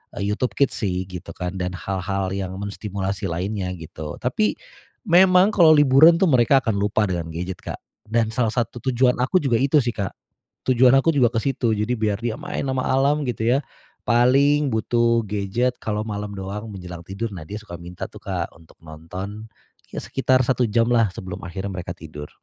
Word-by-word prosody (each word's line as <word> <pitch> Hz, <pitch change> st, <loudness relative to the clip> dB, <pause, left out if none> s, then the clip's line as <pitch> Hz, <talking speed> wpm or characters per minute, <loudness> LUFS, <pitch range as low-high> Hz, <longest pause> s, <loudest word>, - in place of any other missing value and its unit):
eee, 100 Hz, -, -3 dB
YouTube 125 Hz, +4 st, -2 dB
Kids 140 Hz, -, +2 dB
sih 95 Hz, -4 st, -1 dB
gitu 90 Hz, -1 st, -8 dB
kan 90 Hz, 0 st, -4 dB
dan 90 Hz, 0 st, -3 dB
hal-hal 95 Hz, +1 st, -3 dB
yang 95 Hz, -1 st, -4 dB
menstimulasi 100 Hz, -1 st, -4 dB
lainnya 90 Hz, +2 st, -3 dB
gitu. 80 Hz, -2 st, -8 dB
Tapi 170 Hz, +13 st, 0 dB, 0.5 s
memang 185 Hz, +3 st, +6 dB
kalo 160 Hz, -5 st, +6 dB
liburan 145 Hz, +3 st, +7 dB
tuh 185 Hz, -6 st, +3 dB
mereka 130 Hz, +2 st, +4 dB
akan 110 Hz, -3 st, 0 dB
lupa 105 Hz, +1 st, +1 dB
dengan 85 Hz, -3 st, -3 dB
gadget 90 Hz, +3 st, -5 dB
Kak. -, -, -6 dB, 0.3 s
Dan 110 Hz, 0 st, +1 dB
salah 115 Hz, -2 st, 0 dB
satu 120 Hz, 0 st, -2 dB
tujuan 125 Hz, 0 st, +3 dB
aku 130 Hz, +9 st, +2 dB
juga 120 Hz, -5 st, +2 dB
itu 140 Hz, +3 st, +3 dB
sih 120 Hz, -, 0 dB
Kak. 100 Hz, -3 st, -3 dB, 0.5 s
Tujuan 125 Hz, 0 st, +5 dB
aku 150 Hz, +5 st, +3 dB
juga 125 Hz, -4 st, +4 dB
ke 115 Hz, -, +1 dB
situ, 125 Hz, -5 st, 0 dB
jadi 105 Hz, +4 st, 0 dB
biar 105 Hz, -2 st, 0 dB
dia 115 Hz, -1 st, -2 dB
main -, -, -4 dB
sama 130 Hz, -1 st, 0 dB
alam 140 Hz, +3 st, +2 dB
gitu 120 Hz, -2 st, -2 dB
ya, 125 Hz, +3 st, +4 dB, 0.4 s
paling 135 Hz, +4 st, +3 dB
butuh 115 Hz, +1 st, +2 dB
gadget 105 Hz, +5 st, -1 dB
kalo 105 Hz, -1 st, -2 dB
malam 105 Hz, -1 st, -5 dB
doang 100 Hz, +3 st, -6 dB
menjelang 90 Hz, -3 st, -8 dB
tidur. 100 Hz, +5 st, -4 dB
Nah 90 Hz, -4 st, -7 dB
dia 105 Hz, -, -5 dB
suka 95 Hz, -5 st, -9 dB
minta 85 Hz, +1 st, -7 dB
tuh -, -, -13 dB
Kak 90 Hz, -3 st, -3 dB
untuk 80 Hz, 0 st, -20 dB
nonton 90 Hz, +7 st, -8 dB, 0.4 s
ya -, -, -3 dB
sekitar 130 Hz, -1 st, +2 dB
1 125 Hz, 0 st, +2 dB
jam 115 Hz, +2 st, +2 dB
lah 115 Hz, -3 st, +4 dB
sebelum 95 Hz, 0 st, -7 dB
akhirnya 95 Hz, +3 st, -5 dB
mereka 85 Hz, -1 st, -5 dB
tidur. 75 Hz, -3 st, -9 dB
110 Hz, 185 wpm, -22 LUFS, 95-125 Hz, 0.5 s, liburan